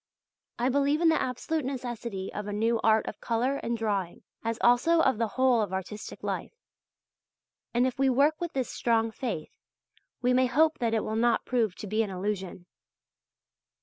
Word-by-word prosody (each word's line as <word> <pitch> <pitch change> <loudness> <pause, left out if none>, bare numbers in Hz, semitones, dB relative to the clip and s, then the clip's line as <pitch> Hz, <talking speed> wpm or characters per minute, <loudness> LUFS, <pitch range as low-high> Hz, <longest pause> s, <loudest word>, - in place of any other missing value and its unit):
I 240 - +1
believe 285 +3 +2
in 335 -1 +4
the 320 - +2
absolute 265 +5 -2
necessity 240 -6 -5
of 210 0 -5
a - - -3
new 225 +2 +1
art 220 0 +4
of - - -7
colour 245 +4 0
and 235 -2 -2
drawing, 200 -6 -2 0.2
as 230 0 -1
also 250 +8 +4
of 265 -7 +3
the 230 - +1
whole 255 -3 +4
of 205 -3 -2
artistic 190 +3 -6
life. - - -4 1.2
And 240 +2 +2
if 260 0 -2
we 270 0 +4
work 285 +5 +3
with 345 -1 -3
this 260 -2 -2
strong 225 -1 +1
faith, 220 -10 -4 0.7
we 250 0 +2
may 255 0 +4
hope 315 +5 +3
that 230 -2 +1
it 220 - 0
will 220 - -3
not 235 0 +2
prove 225 -7 0
to - - -8
be 215 +2 0
an 215 - -1
illusion. 190 -1 -4
235 Hz, 180 wpm, -28 LUFS, 215-260 Hz, 1.2 s, in